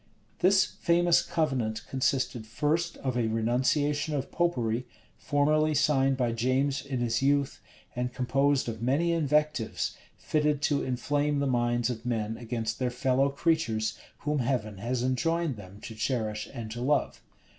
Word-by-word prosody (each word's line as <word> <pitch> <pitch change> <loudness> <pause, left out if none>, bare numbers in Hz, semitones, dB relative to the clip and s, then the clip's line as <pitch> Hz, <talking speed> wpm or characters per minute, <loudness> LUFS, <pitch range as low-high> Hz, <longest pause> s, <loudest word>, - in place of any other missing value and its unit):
This 190 +1 +5
famous 175 0 +2
covenant 135 -10 -1
consisted 130 -3 -1
first 155 +8 -1
of 130 -2 -3
a 120 -2 +1
renunciation 140 +7 +1
of 135 -1 -3
Popery, 125 -9 0 0.3
formerly 155 +1 +2
signed 135 -2 +3
by 120 -3 +1
James 130 +4 0
in 135 -3 -3
his 115 -1 0
youth, 140 0 +1 0.3
and 125 0 -2
composed 135 +2 +1
of 110 -1 -5
many 145 +8 +2
invectives, 150 -7 0 0.2
fitted 150 -1 0
to 145 -1 +2
inflame 145 +3 0
the 140 - +1
minds 120 -1 +1
of 115 -1 -6
men 110 -2 -2
against 115 -2 -4
their 125 -1 +1
fellow 130 +2 +1
creatures, 140 -7 0 0.3
whom 150 0 0
Heaven 115 -6 -1
has 120 +3 -2
enjoined 165 +4 0
them 100 -1 -12
to 115 - -7
cherish 110 -2 -2
and 115 -4 -7
to 120 +2 -5
love. 145 +4 0
130 Hz, 145 wpm, -28 LUFS, 120-150 Hz, 0.3 s, This